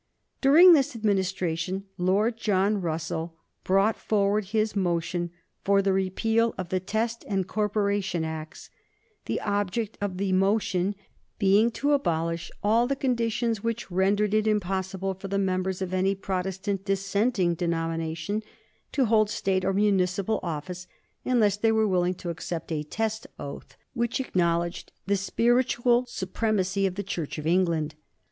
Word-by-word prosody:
During 330 +7 +8
this 285 -4 +2
Administration 190 -3 -1
Lord 200 +6 +1
John 205 -2 +1
Russell 165 0 -3 0.3
brought 195 +4 +3
forward 205 0 +1
his 215 +2 0
motion 175 -2 -1 0.3
for 200 0 +3
the 195 0 +2
repeal 225 +5 +1
of 185 -2 -5
the 185 - 0
Test 225 +5 -2
and 195 -3 -1
Corporation 200 -5 0
Acts; 160 0 -7 0.5
the - - -1
object 205 +1 -2
of 195 -3 -2
the 195 0 -1
motion 195 0 +1 0.4
being 205 +3 +4
to 285 +4 0
abolish 170 - 0
all 225 +4 +3
the 275 - 0
conditions 235 -4 0
which 230 -3 -3
rendered 200 +3 +2
it 215 0 +2
impossible 190 -2 -1
for 190 +1 -8
the 195 +1 -1
members 190 -1 -1
of 185 0 -5
any 190 +1 +2
Protestant 190 0 -3
dissenting 195 0 +1
denomination 165 +2 -2 0.5
to 270 -3 +3
hold 215 -2 +3
State 190 -3 0
or 195 - +1
municipal 195 0 +1
office, 175 +2 -5 0.4
unless 215 -6 +3
they 225 +1 +2
were 220 -1 +3
willing 180 -1 +1
to 175 -1 -5
accept 165 0 -5
a 155 -2 -1
test 220 +8 -3
oath, 140 - -8 0.2
which 235 +1 -1
acknowledged 170 -7 -1
the 200 - +2
spiritual 240 +4 +2
supremacy 195 -2 0
of 185 - -5
the 200 - -3
Church 165 -6 -4
of 150 - -6
England. 165 -3 +1
195 Hz, 140 wpm, -26 LUFS, 180-215 Hz, 0.5 s, During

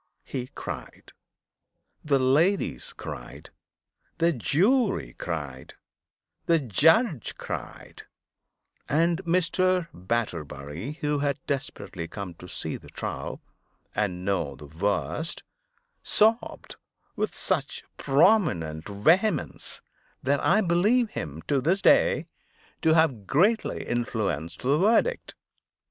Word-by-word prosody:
He 125 -2 -5
cried; - - -7 0.9
the 145 -2 +3
ladies 150 +10 +2
cried; - - -9 0.7
the 170 0 +3
jury 190 - +2
cried; 70 -6 -6 0.7
the 170 - +5
judge 155 - +2
cried; - - -7 0.9
and 170 +4 +2
Mr. 180 0 +2
Batterbury, 85 - -3
who 150 -1 0
had 140 -1 0
desperately 135 - -4
come 100 -1 -6
to - - -10
see - - -2
the - - -15
trial, - - -5 0.5
and 95 -4 -2
know 100 -1 -1
the 75 - -11
worst, 100 - -1 0.6
sobbed 225 +3 +2 0.4
with 215 - -1
such 150 -7 -2
prominent 135 - +2
vehemence, 165 - +1 0.4
that 140 +2 +2
I 205 +5 +3
believe 210 +6 +2
him, 80 +1 -6
to 140 - +1
this 175 +8 +2
day, - - +4 0.6
to 160 0 +4
have 135 - +2
greatly 205 +10 +2
influenced 100 -9 -2
the 140 +4 +3
verdict. 230 - +2
145 Hz, 100 wpm, -26 LUFS, -, 0.9 s, the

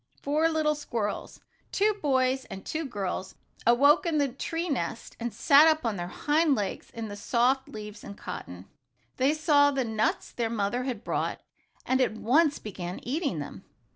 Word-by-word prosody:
Four 305 +3 +2
little 310 -1 +2
squirrels 230 -8 -4 0.3
two 425 +2 +3
boys 260 -2 +1
and 195 0 -9
two 320 0 -3
girls 190 -5 -4 0.3
awoke 285 +8 +5
in 320 -2 +1
the 285 -2 +2
tree 330 +7 -3
nest 230 - -3
and 240 0 -3
sat 280 +8 +6
up 315 -4 +2
on 225 -3 0
their 175 -2 -4
hind 295 - +2
legs 205 -4 -3
in 230 -1 -6
the 205 - -6
soft 250 +5 +1
leaves 210 0 -8
and 200 - -9
cotton. 90 +1 -7 0.5
They 275 +4 +3
saw 295 -2 +4
the 270 -3 -1
nuts 220 -1 -1
their 230 -2 -2
mother 225 +3 -1
had 240 -5 -4
brought, - - -2 0.4
and 260 0 +2
at 255 - +2
once 285 +7 +3
began 180 -4 -6
eating 280 - -1
them. 145 +5 -7
255 Hz, 170 wpm, -28 LUFS, 210-295 Hz, 0.5 s, sat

